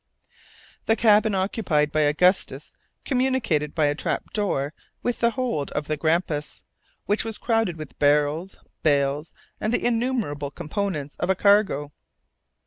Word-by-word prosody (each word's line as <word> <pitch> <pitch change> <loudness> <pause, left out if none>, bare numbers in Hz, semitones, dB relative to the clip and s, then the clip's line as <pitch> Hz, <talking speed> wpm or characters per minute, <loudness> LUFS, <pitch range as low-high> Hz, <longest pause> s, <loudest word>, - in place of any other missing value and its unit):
The 225 - +4
cabin 215 -2 +4
occupied 185 -6 0
by 155 - 0
Augustus 155 +6 +2 0.3
communicated 250 - 0
by 155 -3 +3
a 145 - +2
trap 145 - -3
door 155 -9 -1 0.3
with 245 - -1
the 235 - +4
hold 235 - -2
of 150 - -2
the 155 - -1
Grampus, 155 -1 -1 0.4
which 205 +2 +1
was 225 -1 -4
crowded 225 -7 0
with 155 -3 -9
barrels, 150 +5 +2 0.2
bales, 145 0 +1 0.3
and 215 - -1
the 245 - 0
innumerable 230 - -1
components 155 -1 -4
of 175 - -2
a 190 - +4
cargo. 195 -8 +3
175 Hz, 135 wpm, -24 LUFS, 150-220 Hz, 0.4 s, The